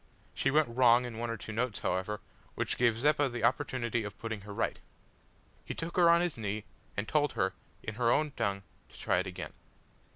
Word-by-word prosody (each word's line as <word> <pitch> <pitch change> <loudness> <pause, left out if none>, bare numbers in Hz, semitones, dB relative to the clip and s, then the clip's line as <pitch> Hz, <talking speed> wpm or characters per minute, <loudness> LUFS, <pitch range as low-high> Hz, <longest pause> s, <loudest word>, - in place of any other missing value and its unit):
She 135 - +1
went 150 +2 +4
wrong 125 -1 +6
in 115 -2 -6
one 120 0 -2
or 115 - -2
two 110 - -7
notes, 115 0 -1
however, 105 +3 -1 0.3
which - - -1
gave 120 -2 +3
Zeppa 145 +2 +3
the 120 -1 -5
opportunity 120 -5 +1
of 105 -1 -7
putting 110 -2 -4
her 100 +1 -9
right. 100 - -1 0.8
He - - -5
took 165 +1 -5
her 175 -2 +6
on 170 0 +6
his 175 -8 -1
knee, 105 0 -2 0.3
and 100 +2 -1
told 145 -2 +2
her, 95 -4 +1 0.3
in 110 - -4
her 115 - +4
own 150 +2 +2
tongue, 100 -5 -1 0.3
to - - -16
try 90 - +2
it 95 - -2
again. 90 - -6
115 Hz, 205 wpm, -31 LUFS, 105-140 Hz, 0.8 s, wrong